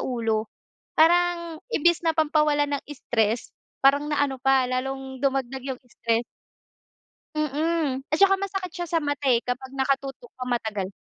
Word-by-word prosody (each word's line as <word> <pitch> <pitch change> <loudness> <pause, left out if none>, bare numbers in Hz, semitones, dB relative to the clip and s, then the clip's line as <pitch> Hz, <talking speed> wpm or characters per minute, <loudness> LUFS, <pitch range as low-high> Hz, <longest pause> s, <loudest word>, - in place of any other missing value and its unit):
ulo. 225 -3 -1 0.5
Parang 340 0 +3
imbes 345 -2 +3
na 325 - +3
pampawala 300 -2 +3
ng 285 -1 -1
stress 230 -5 -1 0.3
parang 285 +2 +5
naano 285 -3 0
pa 270 -1 +4
lalong 265 +1 -3
dumagdag 265 -1 0
yung 250 - -18
stress. 230 -1 -1 1.1
Mm, 305 -2 0
at 305 - +2
saka 390 0 +7
masakit 390 -2 -4
siya 350 -1 -4
sa 335 - +3
mata, 290 -1 -2
eh, 235 - +3
kapag 255 +2 -4
nakatutok 270 -2 -2
ka 255 - -4
matagal. 220 -6 -2
275 Hz, 140 wpm, -25 LUFS, 255-315 Hz, 1.1 s, saka